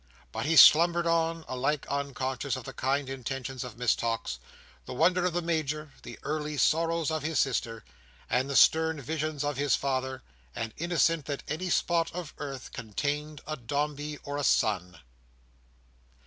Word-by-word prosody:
But 145 - -3
he 165 - +2
slumbered 170 +2 +8
on, 165 -1 +1
alike 135 +3 -1
unconscious 140 -1 -2
of 130 - -6
the - - -8
kind 135 +1 0
intentions 130 0 -5
of 120 -3 -9
Miss 125 -2 +2
Tox, 115 - -2 0.5
the - - -6
wonder 180 +5 +3
of 180 - 0
the 175 0 -1
Major, 155 -2 -2
the - - -9
early 150 0 -3
sorrows 165 +1 +2
of 155 -1 -1
his 155 0 -2
sister, 115 -5 0 0.4
and 130 +2 0
the 140 - -2
stern 160 +1 +5
visions 155 0 -3
of 145 -1 -2
his 145 0 +2
father; 130 -1 -2 0.3
and 115 -1 -4
innocent 165 -2 +2
that 145 -2 -4
any 170 +5 -3
spot 170 -1 +1
of 175 -4 -6
earth 135 -3 -6
contained 145 +6 -3
a 155 - -3
Dombey 145 +3 -3
or 145 0 -4
a 145 - -2
Son. 90 -8 +1
145 Hz, 160 wpm, -29 LUFS, 130-160 Hz, 0.5 s, slumbered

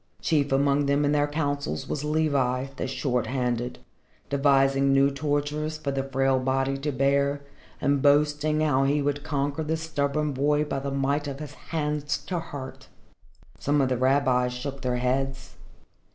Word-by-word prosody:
Chief 145 -4 +1
among 140 +1 +2
them 140 +1 +2
in 145 - +2
their 145 0 +2
councils 145 - -2
was 150 - -3
Levi, 140 -5 +1
the 135 - -3
Short 125 -2 -1
handed, 125 -2 -2 0.5
devising 135 -1 +3
new 135 +1 +4
tortures 145 +2 -2
for 155 -2 -3
the 135 0 -1
frail 135 0 +1
body 135 +1 0
to 145 +2 -2
bear 140 +1 +1 0.4
and 140 0 +1
boasting 150 +2 +3
how 140 -3 +2
he 145 +2 +2
would 145 0 -1
conquer 145 0 -1
the 160 +1 -1
stubborn 150 -2 -1
boy 145 +3 +2
by 140 -2 -3
the 140 +1 -4
might 140 +2 0
of 140 -1 -5
his 150 -1 -7 0.2
hands 150 -2 -1
to 180 -2 -2
hurt. 135 -5 -8 0.7
Some 145 +1 +1
of 135 -2 +2
the 130 - +1
rabbis 130 -1 +2
shook 135 +2 -6
their 125 -1 -1
heads. 130 +1 -2
140 Hz, 165 wpm, -26 LUFS, 135-145 Hz, 0.7 s, new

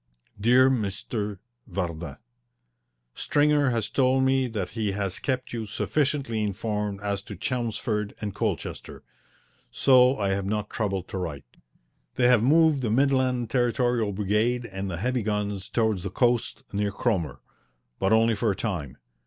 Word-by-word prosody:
DEAR 125 +5 +5
M. 130 -4 +2 0.8
VARDIN, 85 -6 -4 1.0
Stringer 145 -1 +2
has 115 -3 0
told 130 +1 +2
me 130 -1 +2
that 105 -6 -3
he 110 -4 -2
has 100 -2 -2
kept 130 -3 -2
you 115 -2 -4
sufficiently 135 0 -1
informed 105 -1 -2
as 100 -1 -2
to 105 - -9
Chelmsford 110 -1 -2
and 105 -2 -4
Colchester, - - -4 0.7
so 130 0 +5
I 100 -2 0
have 95 0 -1
not 105 0 -2
troubled 95 -4 -2
to 95 - -4
write. 80 -6 -5 0.7
They 125 - +2
have 125 -3 +5
moved 155 +2 +4
the 120 - -1
Midland 130 -1 +2
Territorial 120 -3 +1
Brigade 105 +5 0
and 95 -2 -5
the 85 - -4
heavy 125 +6 0
guns 105 -2 -2
towards 110 -5 +1
the 100 - -4
coast 120 +3 0
near 100 0 0
Cromer, 95 - -1 0.6
but 95 - +1
only 115 +1 +4
for 110 +1 0
a 100 - 0
time. 80 - -4
110 Hz, 145 wpm, -26 LUFS, 100-125 Hz, 1.0 s, DEAR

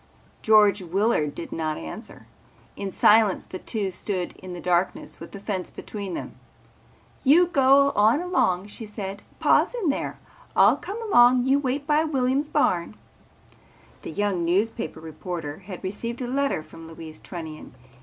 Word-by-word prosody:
George 210 -2 +5
Willard 180 -4 0
did 170 - -7
not 155 -1 -2
answer. 80 -1 -9 0.5
In 200 - -4
silence 210 0 +4
the 185 - -8
two 205 -4 -3
stood 185 0 -3
in 185 -1 -9
the 175 - -6
darkness 180 +1 -1
with - - -10
the 200 - -8
fence 195 -2 -4
between 200 -4 -6
them. - - -7 0.8
"You 315 +7 +6
go 280 -3 +4
on 215 +7 +4
along," 335 - +1
she 215 +2 -7
said. 200 -1 -6 0.2
"Pa's - - +3
in 420 -10 0
there. 280 - -2 0.4
I'll - - +6
come 415 +4 -6
along. 245 - +5
You 270 +2 +3
wait 275 +1 -2
by 300 +1 +3
Williams' 275 -1 0
barn." 175 - +1 1.1
The - - -7
young 195 0 -1
newspaper 200 +7 -1
reporter 160 -1 -6
had 185 -1 -9
received 230 +5 -4
a - - -3
letter 275 - 0
from 165 +1 -12
Louise 160 -1 -10
Trunnion. 160 -6 -9
205 Hz, 155 wpm, -25 LUFS, 180-260 Hz, 1.1 s, You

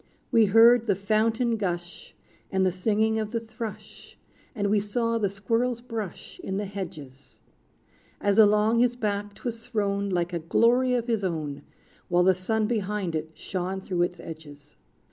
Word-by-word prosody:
We 225 -2 +5
heard 230 +3 +6
the 200 - +3
fountain 225 +4 +1
gush, 175 -3 -5 0.4
And 190 0 +2
the 185 - +3
singing 220 +4 +1
of 215 -1 -2
the 230 +1 -2
thrush; 225 -1 -9 0.4
And 205 -2 0
we 210 - +4
saw 230 +3 -1
the 205 -3 +1
squirrel's 230 +5 -1
brush 225 -6 -7
In 190 - -3
the 205 - -2
hedges, 155 -9 -9 0.8
As 205 +1 +2
along 210 +2 +5
his 245 0 +3
back 205 -3 -3
't - - -18
was 230 -1 -4
thrown, 200 -3 -1
Like 175 -1 -1
a 170 - -1
glory 245 +9 +3
of 240 -2 -1
his 225 -4 -1
own. 155 -6 -3 0.5
While 180 -1 +3
the 190 +1 +5
sun 215 +4 -1
behind 210 -5 -2
it, 160 0 -3
shone 185 +1 -4
Through 185 -2 -2
its 175 0 -1
edges. 150 -3 -11
205 Hz, 165 wpm, -26 LUFS, 185-225 Hz, 0.8 s, heard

